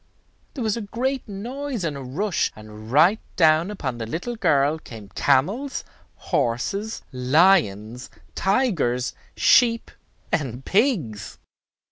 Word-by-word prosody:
There 260 - -3
was 220 -2 0
a 235 - -4
great 255 +6 -3
noise 245 +3 -5
and 155 -3 -2
a 140 - -6
rush, 165 +9 -1
and 110 +1 -11
right 170 +10 +5 0.2
down 160 +1 +4
upon 135 -12 -4
the 115 - -4
little 180 - -4
girl 145 -6 +2
came 110 -8 -11
camels, 190 - +1 0.3
horses, 195 - -2
lions, 125 - +2 0.2
tigers, 175 - 0 0.2
sheep, 230 -2 +4 0.4
and 130 -5 -2
pigs. 150 - 0
160 Hz, 115 wpm, -23 LUFS, -, 0.4 s, right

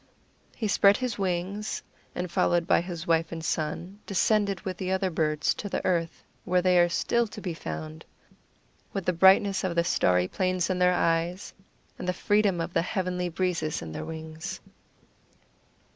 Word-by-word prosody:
He 220 - -2
spread 200 0 +5
his 250 -5 -3
wings, 190 +3 -2 0.3
and, 180 -1 -3
followed 170 0 +2
by - - +3
his 170 -2 -6
wife 165 0 +1
and 165 -1 -5
son, 170 +5 -3
descended 200 0 +2
with 185 -2 -5
the 185 0 -3
other 190 0 0
birds 155 -2 +1
to 205 - -6
the - - -3
earth, 170 -3 -1 0.2
where 180 0 +1
they 180 -1 +4
are 175 0 +4
still 235 +7 +1
to 210 - -9
be 185 -4 -4
found, 80 - -6 0.9
with 195 -3 -3
the 180 - +2
brightness 190 +2 +5
of 180 -2 -1
the 170 - +3
starry 90 - +2
plains 185 - 0
in 180 - -1
their 180 0 +4
eyes 170 +2 0 0.5
and - - -5
the 180 - +1
freedom 205 -1 +2
of 165 +1 -3
the 165 - +3
heavenly 180 -1 -2
breezes 170 - -1
in 80 - -7
their 80 - -5
wings. 160 0 -6
180 Hz, 175 wpm, -27 LUFS, 165-190 Hz, 0.9 s, spread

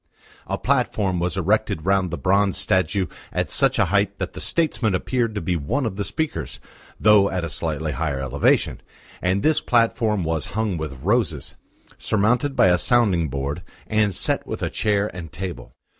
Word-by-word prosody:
A - - -2
platform 95 -4 0
was 90 +2 -1
erected 95 -3 0
round 95 -1 +2
the 85 - -4
bronze 100 0 +2
statue 95 0 +1 0.3
at - - -2
such - - +3
a - - +4
height - - +2
that - - -4
the - - -7
statesman 130 - 0
appeared 115 +3 -1
to 105 - -2
be 90 - -1
one 85 - -1
of 110 - -3
the 100 - -2
speakers, 160 +7 -3 0.4
though 105 -2 +5
at 90 -2 -2
a 85 - -3
slightly 80 +1 -2
higher 70 +1 -2
elevation, 65 -2 +1 0.4
and 95 +2 0
this 155 -1 +3
platform 115 -4 +1
was 80 -1 -2
hung 110 -4 0
with 75 -5 -6
roses, - - 0 0.5
surmounted 120 +7 +1
by 95 - +5
a 90 0 +3
sounding 95 -5 +2
board, 70 +5 -3 0.2
and 105 -3 +1
set - - 0
with - - -5
a - - -1
chair 105 -1 +1
and 85 -3 -7
table. 85 -7 -6
95 Hz, 175 wpm, -22 LUFS, 85-110 Hz, 0.5 s, though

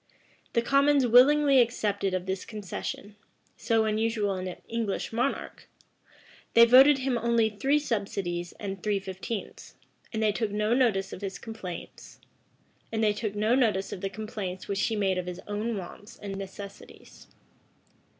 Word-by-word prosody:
[] - - -34
The 235 - +2
commons 280 +1 +4
willingly 270 +3 +6
accepted 205 -5 0
of 185 -1 -3
this 190 0 -3
concession, 205 -1 -6 0.4
so 225 -2 +1
unusual 215 -1 0
in 185 0 -4
an 180 - -7
English 225 -2 -3
monarch: 245 +4 -3 0.9
they 230 0 +9
voted 265 +4 +7
him 260 -2 -1
only 230 -1 +2
three 270 +8 +1
subsidies 200 - -2
and 195 -2 -6
three 205 0 0
fifteenths:[] 195 +3 -7 0.4
and 220 -1 -2
they 215 - +3
took 220 +1 -2
no 210 +2 0
notice 220 -7 +1
of - - -7
the 195 - -3
complaints 195 -2 -9 2.5
which 200 0 -1
he 225 - -1
made 190 -3 +1
of 180 - -5
his 180 0 -5
own 210 +2 -2
wants 195 +3 -9
and 200 -2 -6
necessities. 195 +1 -10
215 Hz, 130 wpm, -28 LUFS, 195-235 Hz, 2.5 s, they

